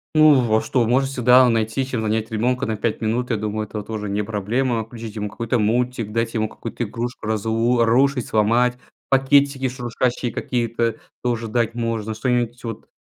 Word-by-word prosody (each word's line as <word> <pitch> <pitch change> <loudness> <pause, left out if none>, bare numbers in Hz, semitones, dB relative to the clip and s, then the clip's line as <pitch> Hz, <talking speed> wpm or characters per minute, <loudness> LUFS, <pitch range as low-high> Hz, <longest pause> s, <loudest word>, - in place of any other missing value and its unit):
Ну, 155 -3 +7
в 115 -3 0
а - - +1
что, 125 -3 +1
можно 130 +4 +2
всегда 125 -1 +5
найти, 115 +3 0
чем 125 -3 -3
занять 110 0 -1
ребёнка 125 +4 0
на 110 - -2
5 110 +1 -2
минут. 115 +3 -1
Я 115 - +1
думаю, 105 +1 -3
это 105 +1 -5
тоже 105 -1 -5
не 105 +1 -1
проблема. 110 +3 -1
Включить 115 -1 -9
ему 105 -1 -3
какой-то 115 +3 -1
мультик, 115 0 0
дать 115 +1 -1
ему 110 -1 0
какую-то 115 +2 -6
игрушку 120 +1 -5
разу 115 +2 +1
рушить, 130 +2 +2
сломать. 120 +3 +2 0.3
Пакетики 135 0 +3
шуршащие 125 -1 -2
какие-то 115 -2 -1 0.3
тоже 120 -2 -1
дать 115 +1 0
можно, 115 -2 -2
что-нибудь, 120 +1 -1
вот. 115 -3 -6
115 Hz, 175 wpm, -21 LUFS, 110-125 Hz, 0.3 s, Ну